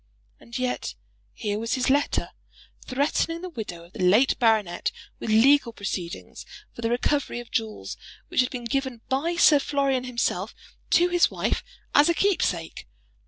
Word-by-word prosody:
And 235 - -8
yet 255 -1 -2 0.4
here 210 -2 -3
was 230 +1 -1
his 255 - 0
letter, 285 +2 +1 0.6
threatening 295 +5 0
the 365 - -4
widow 205 - -6
of 170 +3 -18
the - - -10
late 210 +9 +4
baronet 215 -7 +2 0.3
with - - -5
legal 240 +3 +5
proceedings 190 -5 -5 0.3
for - - -9
the 230 - 0
recovery 250 +1 0
of 240 - -10
jewels 220 -1 -3 0.3
which - - -2
had 250 - 0
been 245 -3 -6
given 265 -1 -2
by 305 +6 0
Sir 310 -4 +6
Florian 275 -2 0
himself 245 -1 -2 0.3
to 350 +1 +4
his 350 -1 +4
wife - - -1 0.3
as 295 +3 +6
a 340 - +2
keepsake! 330 - 0
250 Hz, 160 wpm, -25 LUFS, 220-285 Hz, 0.6 s, Sir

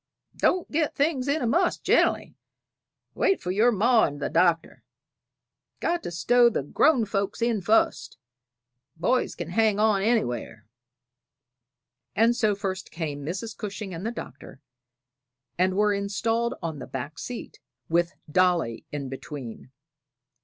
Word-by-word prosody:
"Don't 365 -1 +1
get 305 -1 0
things 280 -3 0
in 290 +1 0
a - - +1
muss 345 +10 +2
gen'ally; - - +2 0.8
wait 390 - +2
for 180 - -3
your 220 +6 +4
ma 230 +2 +4
and 145 -1 -5
the 145 - -3
Doctor. 165 0 +1 1.0
Got 345 +1 0
to - - -5
stow 235 +8 +4
the 200 - -2
grown 255 - +3
folks 200 -1 -2
in 230 -3 0
fust; 215 -5 +1 0.8
boys 235 +11 0
kin 170 -1 -6
hang 215 +2 +2
on 210 -2 +3
anywhere." 125 - -1 1.5
And 230 +2 +4
so 215 -3 +2
first 195 -2 -4
came 150 -4 -5
Mrs. 190 +8 -5
Cushing 200 -2 -6
and 165 +2 -6
the 225 - -1
Doctor, 235 - -9 1.0
and 185 +1 +1
were 210 0 +3
installed 225 +4 -1
on 160 -3 -4
the - - -8
back 140 +4 -6
seat, 245 -2 -7 0.3
with 170 +2 +1
Dolly 170 -8 +1
in 145 -2 -4
between. 130 -2 -8
200 Hz, 140 wpm, -26 LUFS, 165-235 Hz, 1.5 s, your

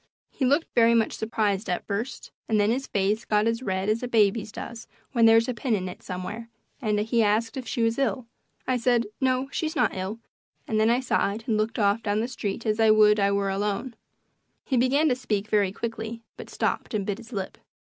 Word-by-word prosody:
He 265 - -1
looked 285 +6 +1
very 235 0 +5
much 225 -1 +2
surprised 215 -2 -1
at 180 - -2
first, 220 +6 -4 0.2
and 215 -1 +2
then 205 +1 +3
his 265 +3 -2
face 205 +3 0
got 210 0 +1
as 230 +1 0
red 190 -4 -2
as 215 +2 +1
a 250 - -3
baby's 220 -2 +2
does 230 +1 -8 0.2
when 230 -3 +4
there's 225 +1 +5
a 250 - -1
pin 235 0 0
in 185 -2 -3
it 180 - -8
somewhere, 195 +6 -6 0.3
and 210 -3 +1
he 230 +2 +1
asked 220 +2 +1
if 260 -3 -6
she 230 - -1
was 230 +3 +1
ill. 265 -2 0 0.4
I 255 -1 +2
said, 240 -1 +2
"No, 260 0 +1
she 320 - -1
is 315 - -5
not 245 -5 +1
ill," 190 +4 -4 0.5
and 215 - 0
then 220 +1 +4
I 240 +2 +3
sighed 220 -4 0
and 225 - 0
looked 215 +1 -1
off 205 +1 +2
down 205 -1 0
the 230 - -1
street 230 -3 -4
as 215 -1 +1
if - - +4
I 220 - +5
would 215 -1 +6
I 200 0 +3
were 200 -1 0
alone. 205 +5 -2 0.7
He 265 - 0
began 265 +5 +3
to 250 - +2
speak 215 -5 -2
very 205 -3 +2
quickly, 230 +1 -5
but - - -10
stopped - - -2
and 200 -2 -1
bit 205 +1 -3
his 235 +1 -13
lip. 195 -4 -5
225 Hz, 225 wpm, -26 LUFS, 205-240 Hz, 0.7 s, would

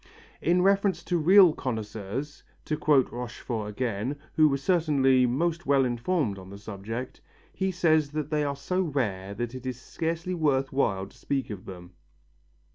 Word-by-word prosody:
In 180 +2 +3
reference 195 -3 +2
to 175 +1 0
real 180 +1 +7
connoisseurs, 110 +3 -5 0.2
to 155 - -1
quote 150 -3 +3
Rochefort 115 -2 -5
again, 115 +3 -2 0.2
who 155 -1 +5
was 135 -1 -2
certainly 140 -8 +3
most 165 +6 -1
well 135 -1 +4
informed 120 - -1
on 95 0 -11
the 100 - -9
subject, 110 +5 -6 0.3
he 190 0 -1
says 160 -5 +2
that 150 -1 -3
they 150 -1 +1
are 140 -1 -1
so 180 +7 -1
rare 105 - -2
that 120 +2 -4
it 130 0 -7
is 125 -1 -4
scarcely 165 +5 -3
worth 140 -6 +1
while 95 -8 +1
to - - -17
speak 135 -4 -3
of 100 -3 -7
them. 90 -1 -10
135 Hz, 165 wpm, -27 LUFS, 115-160 Hz, 0.3 s, real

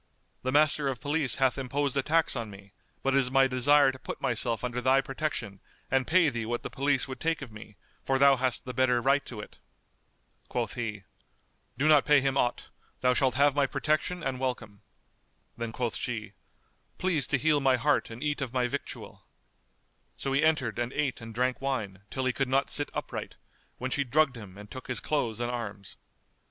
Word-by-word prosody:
The 130 - -1
Master 150 0 +3
of 130 -3 -2
Police 145 -3 0
hath 135 0 +2
imposed 135 +1 -1
a 135 - +2
tax 160 +3 +1
on 115 -3 -4
me, 100 0 -13 0.3
but 135 - +1
it 135 - +5
is 130 -2 +2
my 135 0 +5
desire 135 +2 +4
to 130 - -12
put - - -6
myself 115 -2 0
under 125 0 -2
thy 130 +2 +4
protection 135 -8 -3 0.3
and 135 -1 +2
pay 175 0 +4
thee 120 -4 -3
what 120 +1 -2
the - - -6
police 140 -1 0
would 130 - -7
take 165 -2 -1
of 125 - -10
me, 105 -1 -12 0.3
for 135 - +1
thou 140 0 +6
hast 130 -1 +1
the 125 - -5
better 125 -1 +3
right 135 +3 +2
to 120 - -7
it." 105 - -10 0.9
Quoth - - -2
he, 110 -4 -4 0.7
"Do 145 - +2
not 150 -3 +6
pay 150 -1 +5
him 135 0 0
aught: 120 -3 0 0.3
thou 125 0 +4
shalt 130 -1 +1
have 140 +1 +4
my 140 -1 +2
protection 160 +5 -1
and 130 -1 -2
welcome." 120 -6 -4 0.7
Then 115 -1 -4
quoth 120 -1 -2
she, 110 -4 -4 0.6
"Please 175 -7 +1
to 140 - +2
heal 150 +1 +3
my 135 -2 +3
heart 120 - +1
and 115 +4 -8
eat 145 -1 -1
of 130 -4 -3
my 125 -1 +1
victual," 140 +3 -7 0.9
So 135 - -3
he 140 - +3
entered 135 -8 +1
and 120 +1 -1
ate 140 -5 -1
and 115 0 -8
drank 125 +3 -1
wine, 110 -9 -2
till 130 -1 -3
he 130 - +1
could 135 0 -1
not 135 +1 +1
sit 145 - 0
upright, - - -5 0.4
when 130 +1 -4
she 140 - +1
drugged 140 +1 +2
him 100 -5 -10
and 105 0 -12
took 130 - -8
his 125 - -2
clothes 120 -7 -1
and 120 0 -1
arms. 100 -5 -6
130 Hz, 205 wpm, -29 LUFS, 120-140 Hz, 0.9 s, thou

